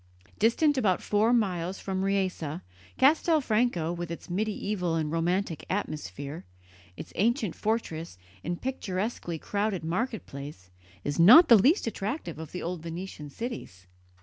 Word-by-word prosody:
Distant 275 +5 +3
about 190 -7 +1
four 215 +3 +2
miles 190 -6 0
from 190 -1 -3
Riese, 185 -5 -1 0.4
Castelfranco, 250 - +3
with 175 -1 -5
its 170 +1 -7
medieval 200 -3 -1
and 155 -2 -1
romantic 170 0 -1
atmosphere, 150 - -4 0.5
its - - -9
ancient 220 - +1
fortress 170 - -3 0.3
and 175 +1 -3
picturesquely 195 -7 -3
crowded 200 +1 -2
market 220 +8 -2
place, 140 -10 -9 0.3
is 145 +3 -2
not 250 - +9
the 235 - +10
least 270 - +4
attractive 210 - -4
of 160 -2 -8
the 180 - -5
old 175 -1 -4
Venetian 165 -2 -7
cities. 145 - -7
185 Hz, 130 wpm, -28 LUFS, 165-225 Hz, 0.5 s, the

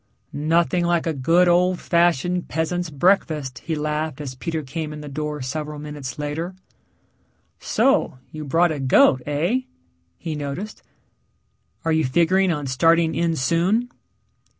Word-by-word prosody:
"Nothing 170 +4 +1
like 170 -1 +1
a 165 - 0
good 165 +6 +3
old 180 +1 +3
fashioned 175 +1 +1
peasant's 170 +2 -2
breakfast," 150 -4 +1
he 165 - -3
laughed 150 -1 -2
as 140 -3 -5
Peter 160 +4 -4
came 155 +3 -5
in 150 - -8
the 150 - -8
door 150 0 -4
several 150 +3 -4
minutes 145 -4 -7
later. 155 +5 -4 1.0
"So, 270 - +1
you 155 0 -7
brought 165 +4 +2
a 150 - -3
goat, 130 -1 +4
heh?" 160 - +1 0.6
he 165 -2 -5
noticed. 150 +8 -5 1.0
"Are 165 - +1
you 160 0 +2
figuring 175 +7 +2
on 150 -3 -3
starting 165 +5 +3
in 170 -1 0
soon?" 175 - +1
160 Hz, 140 wpm, -22 LUFS, 145-175 Hz, 1.0 s, goat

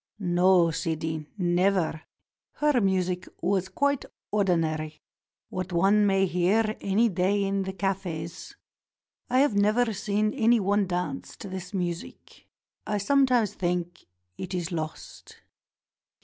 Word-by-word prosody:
"No, 180 -2 +3
Sidi, 160 -1 -3
never. 180 -2 +1 0.5
Her 295 -5 +2
music 185 -2 0
was 185 0 0
quite 285 -1 0 0.3
ordinary; 160 -6 0 0.5
what 185 0 -4
one 200 +4 +4
may 195 -1 +3
hear 200 +5 +1
any 205 +4 +2
day 195 +1 +1
in 195 0 0
the 190 0 -4
cafes. 185 -4 -4 0.7
I 255 +2 +4
have 285 -5 +3
never 215 +3 +2
seen 210 +1 0
any 235 -2 +3
one 200 0 +1
dance 175 -6 -3
to 200 - -8
this 185 0 -6
music. 175 -2 -5 0.4
I 210 - 0
sometimes 245 -1 +2
think 175 -1 -3 0.3
it 185 0 -4
is 175 -1 -3
lost." 155 -2 -7
190 Hz, 120 wpm, -27 LUFS, 175-210 Hz, 0.7 s, one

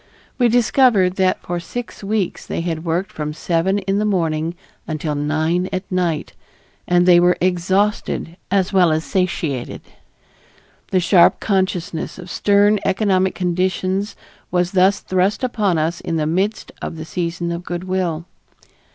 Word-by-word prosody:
We 245 - +5
discovered 230 -5 +3
that 185 -1 +1
for 175 0 -3
six 230 +6 -7
weeks 200 -2 -2
they - - -2
had 165 -2 -3
worked 175 +3 -1
from 150 0 -4
seven 170 +4 0
in 195 0 -1
the - - +1
morning 165 -5 0 0.3
until 155 -1 -2
nine 155 +5 0
at 185 - -2
night, 175 -4 -1 0.5
and 175 0 +3
they 175 -1 +7
were 180 +1 +3
exhausted 185 0 0
as 190 0 +1
well 180 -4 +5
as 155 +1 0
satiated. 165 -9 -2 1.1
The 185 - +2
sharp 175 0 +5
consciousness 185 -5 -1
of 180 -1 -9
stern 205 +1 +3
economic 190 -2 +1
conditions 185 +2 -1 0.3
was 180 0 0
thus 190 +1 +3
thrust 185 +5 0
upon 210 -8 +1
us 160 +2 -1
in 165 - -3
the 155 -1 0
midst 190 +7 -1
of - - -5
the 160 -1 -7
season 170 0 -3
of 170 +1 -4
good 175 0 -4
will. 180 -3 -2
180 Hz, 150 wpm, -20 LUFS, 170-195 Hz, 1.1 s, they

